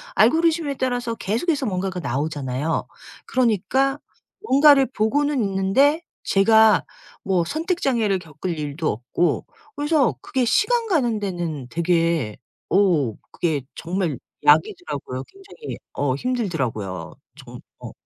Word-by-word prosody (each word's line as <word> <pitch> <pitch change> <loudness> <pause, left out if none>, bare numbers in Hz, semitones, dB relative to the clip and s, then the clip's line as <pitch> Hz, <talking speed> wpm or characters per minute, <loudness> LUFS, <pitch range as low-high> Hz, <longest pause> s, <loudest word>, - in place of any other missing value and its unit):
알고리즘에 325 - +3
따라서 245 -2 -1
계속해서 265 - -1
뭔가가 185 -3 -2
나오잖아요. 145 +1 -2 0.4
그러니까 260 +4 +1 0.4
뭔가를 280 -4 +6
보고는 265 +3 0
있는데 200 - +2 0.2
제가 220 +1 +5 0.4
뭐 185 -3 +1
선택 335 - -2
장애를 220 -7 +1
겪을 165 +1 -6
일도 150 +1 -3
없고 125 +10 -1 0.3
그래서 290 - +2
그게 260 -2 -1
시간 460 - +2
가는 245 - +1
데는 175 -9 -4
되게 165 - 0 0.3
오 165 - +2 0.2
그게 155 -5 -1
정말 170 -4 -2 0.3
약이더라고요. 145 -3 +1
굉장히 395 +3 -10 0.2
어 140 -3 0
힘들더라고요. 130 - -3 0.3
정 - - -11 0.2
어. - - -7
195 Hz, 275 characters per minute, -22 LUFS, -, 0.4 s, 뭔가를